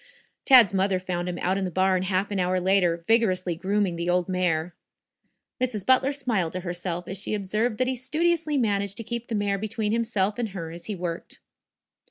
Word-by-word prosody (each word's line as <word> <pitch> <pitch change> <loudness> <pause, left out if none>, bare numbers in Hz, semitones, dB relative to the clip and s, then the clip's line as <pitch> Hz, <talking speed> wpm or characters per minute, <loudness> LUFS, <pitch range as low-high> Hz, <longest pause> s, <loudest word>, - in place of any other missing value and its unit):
Tad's 245 -7 +7
mother 190 0 +2
found 180 -1 -3
him 175 - -4
out 185 +2 0
in - - -2
the 185 - -1
barn 185 +1 +2
half 190 +2 -1
an 200 - -1
hour 185 0 +1
later, 180 -3 +2
vigorously 185 -6 +2
grooming 195 0 0
the 170 +1 -2
old 180 0 +1
mare. 180 -2 0 0.9
Mrs. 220 -6 -2
Butler 260 +1 +4
smiled 230 - -1
to 185 - -3
herself 175 -1 -4
as 190 - -4
she 210 - -2
observed 210 +3 -1
that 255 - +1
he 260 - 0
studiously 310 +4 0
managed 200 -4 0
to 230 - -3
keep 235 +1 -5
the 225 - -3
mare 200 -1 0
between 215 0 -2
himself 215 -2 0
and 230 -3 -1
her 170 -4 -6
as 170 0 -10
he 210 - -4
worked. 170 -2 -6
195 Hz, 200 wpm, -25 LUFS, 180-225 Hz, 0.9 s, Tad's